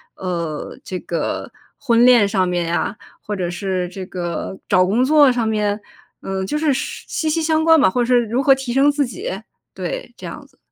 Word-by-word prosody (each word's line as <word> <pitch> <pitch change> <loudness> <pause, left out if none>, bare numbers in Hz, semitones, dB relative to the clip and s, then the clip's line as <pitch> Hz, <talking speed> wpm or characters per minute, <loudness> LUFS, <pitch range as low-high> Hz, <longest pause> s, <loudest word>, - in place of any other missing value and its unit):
呃， 170 -5 -4
这 185 - -5
个 170 - -3 0.3
婚 240 -4 +3
恋 245 -4 +6
上 195 -2 +1
面 175 -1 0
呀， 170 +4 -1 0.2
或 210 - -5
者 180 -3 -2
是 180 0 -2
这 185 +1 -7
个 175 +1 -5
找 185 -2 +4
工 215 +7 +2
作 290 0 +6
上 245 -2 0
面， 210 -1 0 0.4
嗯， 190 0 -3
就 300 - -1
是 300 -2 +2
是 265 - -4
息 315 - -2
息 325 +1 0
相 315 0 +2
关 325 -1 +6
吧， - - +5
或 245 +6 0
者 - - +2
是 245 0 +4
如 240 +5 0
何 275 0 +5
提 265 -2 -5
升 270 +3 +4
自 290 -1 +1
己， 370 - -6 0.5
对， - - -5
这 - - -11
样 - - -8
子。 - - -32
230 Hz, 225 characters per minute, -20 LUFS, 185-275 Hz, 0.5 s, 恋